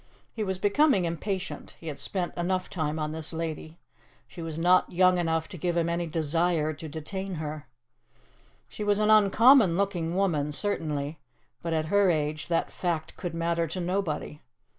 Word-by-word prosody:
He 220 Hz, -, -2 dB
was 190 Hz, -2 st, -2 dB
becoming 205 Hz, -, +3 dB
impatient; 185 Hz, +3 st, -4 dB
he -, -, -14 dB
had 150 Hz, -3 st, -5 dB
spent 180 Hz, -3 st, -3 dB
enough 185 Hz, +1 st, -1 dB
time 155 Hz, -3 st, -2 dB
on 155 Hz, -1 st, -2 dB
this 160 Hz, 0 st, -3 dB
lady. 160 Hz, 0 st, -5 dB, 0.5 s
She 170 Hz, -, -10 dB
was 160 Hz, -1 st, -5 dB
not 180 Hz, +2 st, +4 dB
young 185 Hz, 0 st, +4 dB
enough 165 Hz, -1 st, 0 dB
to 185 Hz, -4 st, -8 dB
give 175 Hz, +2 st, -1 dB
him 170 Hz, 0 st, +1 dB
any 170 Hz, 0 st, -1 dB
desire 160 Hz, 0 st, 0 dB
to 155 Hz, +1 st, -8 dB
detain 190 Hz, +5 st, -5 dB
her. 155 Hz, -1 st, -5 dB, 1.0 s
She -, -, -6 dB
was 205 Hz, -1 st, +2 dB
an 215 Hz, 0 st, +3 dB
uncommon 215 Hz, -1 st, +6 dB
looking 180 Hz, -4 st, -1 dB
woman, 155 Hz, -7 st, +1 dB
certainly, 150 Hz, -5 st, -2 dB, 0.4 s
but 165 Hz, -1 st, -2 dB
at 155 Hz, -1 st, 0 dB
her 200 Hz, -2 st, +5 dB
age 155 Hz, -2 st, -1 dB
that 170 Hz, -1 st, 0 dB
fact 170 Hz, -3 st, -3 dB
could 175 Hz, -2 st, -5 dB
matter 170 Hz, 0 st, 0 dB
to 165 Hz, +4 st, -5 dB
nobody. 175 Hz, -4 st, -2 dB
170 Hz, 170 wpm, -27 LUFS, 155-190 Hz, 1.0 s, uncommon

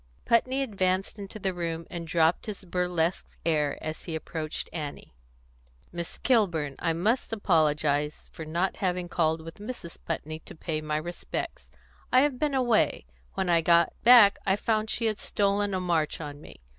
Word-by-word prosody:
Putney 255 Hz, +3 st, +2 dB
advanced 195 Hz, -3 st, -1 dB
into 200 Hz, +2 st, -7 dB
the 190 Hz, -2 st, -1 dB
room, 165 Hz, -1 st, -3 dB
and 170 Hz, -2 st, -5 dB
dropped 165 Hz, +3 st, +2 dB
his 205 Hz, -2 st, -5 dB
burlesque 180 Hz, -1 st, -1 dB
air 150 Hz, -3 st, +1 dB
as 155 Hz, 0 st, -5 dB
he 165 Hz, -, -4 dB
approached 155 Hz, -1 st, -4 dB
Annie. 150 Hz, -, -6 dB, 0.8 s
"Miss 170 Hz, -1 st, -5 dB
Kilburn, 170 Hz, -, +1 dB
I 165 Hz, -, +1 dB
must 210 Hz, +11 st, 0 dB
apologise 150 Hz, -7 st, +1 dB
for 160 Hz, -, -7 dB
not 170 Hz, +4 st, -1 dB
having 180 Hz, -2 st, -1 dB
called 160 Hz, -2 st, +1 dB
with 165 Hz, +3 st, -10 dB
Mrs. 205 Hz, -6 st, -8 dB
Putney 155 Hz, -1 st, -4 dB
to -, -, -13 dB
pay 155 Hz, -1 st, -3 dB
my 150 Hz, 0 st, -1 dB
respects. 170 Hz, +3 st, -5 dB, 0.4 s
I 255 Hz, -, +6 dB
have 280 Hz, -3 st, +1 dB
been 295 Hz, -2 st, +1 dB
away; 240 Hz, -, +2 dB, 0.3 s
when 190 Hz, -, -1 dB
I 170 Hz, -1 st, +4 dB
got 170 Hz, 0 st, +4 dB
back 230 Hz, -4 st, +8 dB
I 190 Hz, -1 st, +2 dB
found 215 Hz, +1 st, 0 dB
she 230 Hz, -, 0 dB
had 215 Hz, -2 st, 0 dB
stolen 205 Hz, 0 st, +1 dB
a -, -, 0 dB
march 170 Hz, -4 st, 0 dB
on 145 Hz, -2 st, -7 dB
me. -, -, -14 dB
175 Hz, 170 wpm, -28 LUFS, 160-205 Hz, 0.8 s, back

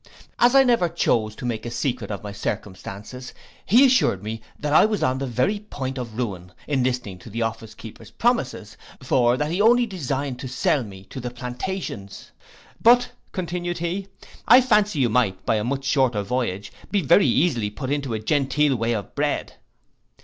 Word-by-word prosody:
As 245 Hz, +2 st, +5 dB
I 270 Hz, -, +8 dB
never 235 Hz, -9 st, +2 dB
chose 115 Hz, -10 st, 0 dB
to 125 Hz, -, -8 dB
make 115 Hz, -3 st, -3 dB
a 120 Hz, -, -4 dB
secret 120 Hz, +2 st, -2 dB
of 105 Hz, -1 st, -5 dB
my 105 Hz, -, -6 dB
circumstances, 100 Hz, +5 st, -6 dB, 0.3 s
he 245 Hz, +7 st, +7 dB
assured 250 Hz, -, +3 dB
me 110 Hz, +1 st, -5 dB, 0.2 s
that 145 Hz, 0 st, -2 dB
I -, -, +7 dB
was 215 Hz, -1 st, 0 dB
upon 130 Hz, +1 st, +1 dB
the 135 Hz, -, -3 dB
very 130 Hz, -, 0 dB
point 135 Hz, -10 st, -5 dB
of 115 Hz, -3 st, -7 dB
ruin, 95 Hz, -7 st, -4 dB
in 135 Hz, -4 st, +1 dB
listening 125 Hz, -7 st, -2 dB
to 115 Hz, -, -12 dB
the 115 Hz, +2 st, -2 dB
office 115 Hz, -1 st, -5 dB
keeper's 110 Hz, -1 st, -11 dB
promises; 135 Hz, -, -1 dB, 0.3 s
for 125 Hz, -1 st, +3 dB
that 150 Hz, +2 st, -1 dB
he 180 Hz, +4 st, 0 dB
only 240 Hz, +3 st, +5 dB
designed 140 Hz, -, -3 dB
to 130 Hz, -, -5 dB
sell 130 Hz, +2 st, +1 dB
me 95 Hz, -3 st, -11 dB
to 135 Hz, -, -6 dB
the 125 Hz, -1 st, -4 dB
plantations. 125 Hz, -, -6 dB, 0.5 s
But, 245 Hz, +1 st, +5 dB, 0.2 s
continued 175 Hz, -1 st, -3 dB
he, 175 Hz, +3 st, -3 dB, 0.4 s
I 245 Hz, +4 st, +9 dB
fancy 210 Hz, -7 st, +2 dB
you 130 Hz, -4 st, +2 dB
might, 110 Hz, -5 st, 0 dB
by 110 Hz, -, +2 dB
a 105 Hz, -, -1 dB
much 135 Hz, +3 st, -2 dB
shorter 130 Hz, -6 st, +2 dB
voyage, 100 Hz, -4 st, -3 dB, 0.2 s
be 200 Hz, -3 st, +1 dB
very 145 Hz, +5 st, +5 dB
easily 125 Hz, -5 st, +2 dB
put 130 Hz, +6 st, -5 dB
into 140 Hz, -5 st, -1 dB
a -, -, -3 dB
genteel 140 Hz, +3 st, +1 dB
way 115 Hz, 0 st, 0 dB
of 105 Hz, -5 st, -5 dB
bread. -, -, -1 dB
130 Hz, 185 wpm, -23 LUFS, 115-175 Hz, 0.5 s, I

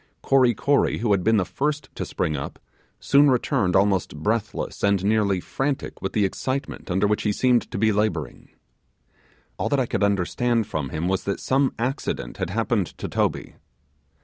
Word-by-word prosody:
Kory 130 Hz, -4 st, +4 dB
Kory, 140 Hz, +6 st, +2 dB
who 115 Hz, -2 st, 0 dB
had 95 Hz, -3 st, +2 dB
been 110 Hz, +2 st, +3 dB
the 95 Hz, -, +1 dB
first 145 Hz, -, -2 dB
to -, -, -5 dB
spring 75 Hz, -, -1 dB
up, 70 Hz, 0 st, -5 dB, 0.4 s
soon 145 Hz, +1 st, +5 dB
returned 105 Hz, -7 st, +1 dB
almost 95 Hz, -5 st, +2 dB
breathless, 105 Hz, +6 st, -2 dB
and 100 Hz, -2 st, +2 dB
nearly 100 Hz, -3 st, +2 dB
frantic 135 Hz, +9 st, -3 dB
with -, -, -3 dB
the 105 Hz, -3 st, +2 dB
excitement 130 Hz, +7 st, -4 dB
under 95 Hz, +3 st, +1 dB
which 105 Hz, +1 st, +1 dB
he 105 Hz, -, +1 dB
seemed 125 Hz, +2 st, +2 dB
to -, -, -5 dB
be 110 Hz, 0 st, +3 dB
labouring. 95 Hz, -, -2 dB, 1.1 s
All -, -, 0 dB
that 140 Hz, -, +2 dB
I 130 Hz, -, +2 dB
could -, -, -2 dB
understand 100 Hz, +4 st, +1 dB
from 75 Hz, -7 st, -3 dB
him 80 Hz, +5 st, -2 dB
was 95 Hz, 0 st, 0 dB
that 100 Hz, -, -2 dB
some 135 Hz, 0 st, +1 dB
accident 120 Hz, -, -3 dB
had -, -, -3 dB
happened 110 Hz, -1 st, 0 dB
to -, -, -4 dB
Toby. -, -, -2 dB
105 Hz, 175 wpm, -24 LUFS, 95-125 Hz, 1.1 s, soon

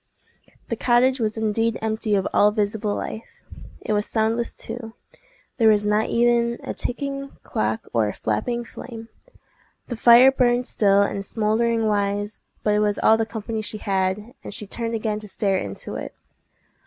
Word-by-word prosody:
The -, -, 0 dB
cottage 255 Hz, +2 st, +3 dB
was 220 Hz, -1 st, -1 dB
indeed 220 Hz, +1 st, 0 dB
empty 220 Hz, -1 st, -1 dB
of 195 Hz, -, +1 dB
all 205 Hz, -, +5 dB
visible 210 Hz, 0 st, -1 dB
life. 220 Hz, -, -7 dB, 0.4 s
It -, -, -2 dB
was 210 Hz, 0 st, 0 dB
soundless, 225 Hz, +1 st, 0 dB
too: 225 Hz, -1 st, -7 dB, 0.6 s
there 230 Hz, -3 st, +4 dB
was 210 Hz, -1 st, +3 dB
not 210 Hz, +1 st, +1 dB
even 235 Hz, 0 st, +2 dB
a -, -, -4 dB
ticking 275 Hz, +2 st, -4 dB
clock 110 Hz, +1 st, -2 dB
or 115 Hz, -3 st, +2 dB
a 105 Hz, -, -3 dB
flapping 235 Hz, -, -2 dB
flame. 230 Hz, -1 st, -9 dB, 0.8 s
The 240 Hz, -, -3 dB
fire 240 Hz, +3 st, +7 dB
burned 245 Hz, -1 st, +2 dB
still 200 Hz, -4 st, +3 dB
and 200 Hz, 0 st, -2 dB
smouldering 225 Hz, +2 st, 0 dB
wise; 205 Hz, 0 st, -1 dB, 0.2 s
but 210 Hz, -, +2 dB
it 210 Hz, -, +2 dB
was 210 Hz, -1 st, +1 dB
all 220 Hz, -, +5 dB
the 225 Hz, 0 st, -1 dB
company 220 Hz, 0 st, -4 dB
she 215 Hz, 0 st, -4 dB
had, 195 Hz, +3 st, -1 dB
and -, -, -7 dB
she 210 Hz, -, -4 dB
turned 230 Hz, +3 st, -3 dB
again 215 Hz, -1 st, -2 dB
to 215 Hz, -, -8 dB
stare 195 Hz, -1 st, 0 dB
into 100 Hz, -1 st, -7 dB
it. -, -, -7 dB
220 Hz, 165 wpm, -23 LUFS, 205-235 Hz, 0.8 s, fire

